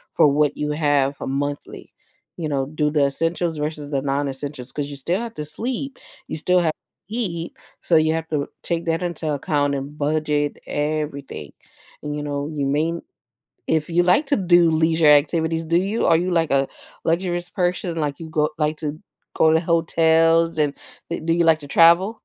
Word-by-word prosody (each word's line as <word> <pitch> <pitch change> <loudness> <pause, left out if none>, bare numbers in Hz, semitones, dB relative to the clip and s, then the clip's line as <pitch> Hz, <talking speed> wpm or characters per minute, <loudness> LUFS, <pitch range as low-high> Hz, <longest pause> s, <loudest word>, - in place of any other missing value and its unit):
for - - +6
what 145 +1 +2
you 150 0 -2
have 145 -2 +1
a - - -4
monthly, 145 +1 -4 0.4
you 160 -3 -3
know, 135 -2 0
do 150 +1 -1
the 150 -2 +2
essentials 165 +3 -1
versus 150 -1 -4
the 140 -2 -1
non-essentials 140 -1 -3
'cause 145 -1 -3
you 145 - -7
still 170 +8 -1
have 230 -1 -5
to 150 - -5
sleep, 255 - -4 0.3
you - - -4
still 180 +4 +2
have 160 -3 +1 0.4
eat. 180 -8 -3 0.3
So, 170 - +1
you 155 0 +4
have 160 0 -3
to 145 -2 -1 0.2
take 170 -1 -2
that 165 +1 0
into 165 -3 -3
account 145 0 0
and 140 +2 -6
budget 150 0 0
everything. 145 - -3 0.5
And, 150 0 -4
you 150 - -4
know, 145 0 -3
you 150 -3 -3
may 155 +4 +1 0.7
if 160 -1 0
you 175 +1 +3
like 180 - +3
to 285 - +2
do 175 -3 +4
leisure 160 0 +3
activities, 160 +2 +3
do 170 +2 +2
you? 205 +4 -1
Are 165 - +5
you, 180 +2 -1
like, 165 -3 +1
a 135 0 +2 0.4
luxurious 175 +1 -1
person, 175 -2 -1
like, 150 -3 -2
you 165 -1 -8
go 150 -1 +1
like 150 +1 0
to 155 0 -5 0.3
go 160 - +4
to 160 - +4
hotels 165 -1 +3
and, 145 -2 +2 0.4
uh, 170 - -1
do 165 - +2
you 170 0 +2
like 160 -1 +5
to 145 - -10
travel? 170 +7 +5
155 Hz, 190 wpm, -22 LUFS, 145-170 Hz, 0.7 s, for